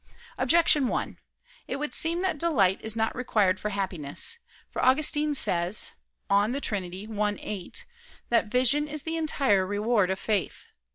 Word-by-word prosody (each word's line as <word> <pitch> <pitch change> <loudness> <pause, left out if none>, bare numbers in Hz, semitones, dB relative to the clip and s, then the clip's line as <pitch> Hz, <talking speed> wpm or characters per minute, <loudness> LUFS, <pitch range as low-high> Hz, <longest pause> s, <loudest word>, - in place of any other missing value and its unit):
Objection 310 -5 +4
1: - - -3 0.5
It - - -3
would 295 +2 -4
seem 335 +2 +2
that 370 -5 -1
delight 215 - +2
is 220 0 -1
not 225 0 -1
required 210 -6 +1
for 210 - -3
happiness. 190 - -2 0.3
For - - -4
Augustine 295 +2 +3
says 175 -4 +1 0.4
(De 205 +7 +2
Trin. 205 -8 0
i, 205 +3 -3
8) 210 - -5 0.4
that 230 -2 +2
"vision 255 +6 +2
is 300 -1 -5
the 325 0 -3
entire 275 -11 +2
reward 205 0 +1
of 190 - -1
faith." 205 -2 -3
225 Hz, 150 wpm, -27 LUFS, 200-295 Hz, 0.5 s, Objection